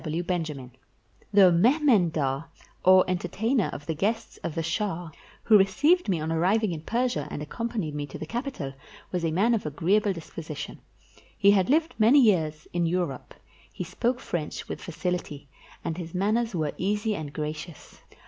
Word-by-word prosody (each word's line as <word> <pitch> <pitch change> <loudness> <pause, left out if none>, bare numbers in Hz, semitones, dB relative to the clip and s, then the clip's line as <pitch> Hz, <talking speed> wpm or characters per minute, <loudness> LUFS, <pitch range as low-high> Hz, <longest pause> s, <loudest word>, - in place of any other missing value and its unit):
G. - - -14
W. 160 +3 -2
BENJAMIN 155 -8 -3 0.6
The 195 -3 +7
mehmendar, 170 - +3 0.4
or 185 0 +6
entertainer 195 +6 0
of 145 - -8
the 160 - -2
guests 210 +8 -2
of 165 - -5
the 165 - -1
shah, 170 -1 -2 0.3
who 215 -3 +6
received 295 - +3
me 180 -4 +1
on 155 +1 -3
arriving 190 +6 +2
in 160 -2 -4
Persia, 230 - -1
and - - -5
accom 230 +11 -4
panied 175 -10 -3
me 145 0 -4
to 135 - -8
the - - -6
capital, 235 - -4 0.4
was 180 -2 -2
a 165 - +1
man 200 +9 +2
of 215 -8 -1
agreeable 195 +8 +2
dis 170 -4 -8
position. 155 -3 -7 0.6
He 200 - +6
had 190 -3 +3
lived 320 +3 +2
many 235 +7 +6
years 160 - +2
in 175 -1 +1
Europe; 170 -6 -2 0.4
he - - -5
spoke 245 +1 -1
French 160 -9 -4
with - - -6
facility, 170 -4 -4 0.4
and 165 +2 -3
his 170 0 -7
manners 215 +3 +1
were 155 -3 -1
easy 210 +3 0
and 155 -7 -5
gracious. 150 +1 -7
180 Hz, 175 wpm, -27 LUFS, 155-215 Hz, 0.6 s, The